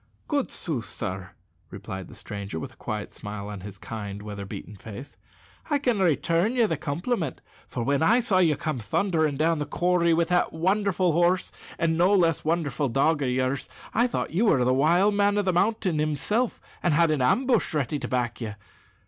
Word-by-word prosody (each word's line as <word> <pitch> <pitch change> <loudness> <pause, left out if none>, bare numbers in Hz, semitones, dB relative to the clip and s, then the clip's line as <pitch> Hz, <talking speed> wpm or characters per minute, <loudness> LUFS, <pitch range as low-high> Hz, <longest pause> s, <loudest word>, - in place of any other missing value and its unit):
"Good 285 -3 0
sooth, 140 - -3
sir," 95 -3 -5 0.4
replied 95 -1 -7
the - - -13
stranger, 100 -5 -6
with - - -7
a - - -24
quiet - - -5
smile 105 0 -6
on 105 -2 -6
his 100 0 -9
kind, 105 -1 -6
weather 100 -1 -6
beaten 105 +2 -8
face, 110 +7 -9 0.5
"I 290 - +3
can 245 -6 0
return 175 - +2
you 240 -2 +4
the 165 - 0
compliment; 160 - -2 0.3
for 120 - -3
when 140 +4 +1
I 225 +10 +5
saw 220 -6 +2
you 165 -4 +4
come 155 -6 -2
thundering 155 - 0
down 160 +1 +2
the 150 - -3
corrie 175 +1 +2
with 165 0 +1
that 180 0 +2
wonderful 185 +1 +1
horse 175 +3 +2 0.3
and 165 -1 +1
no 185 +4 +5
less 165 -4 +2
wonderful 150 -4 0
dog 145 +5 +2
of 135 - +1
yours, 130 +2 -1 0.2
I 235 +3 +3
thought 235 - -3
you 200 +7 +2
were 130 - +4
the 125 - +3
wild 170 +9 +4
man 205 0 +2
o' 205 - +2
the 185 -2 +1
mountain 190 -3 +1
himself, 155 - 0 0.2
and 165 -4 +2
had 165 0 +4
an 150 -3 +1
ambush 240 - +2
ready 145 0 0
to - - -4
back 125 -2 -1
you. 110 -2 -4
160 Hz, 195 wpm, -26 LUFS, 125-185 Hz, 0.5 s, I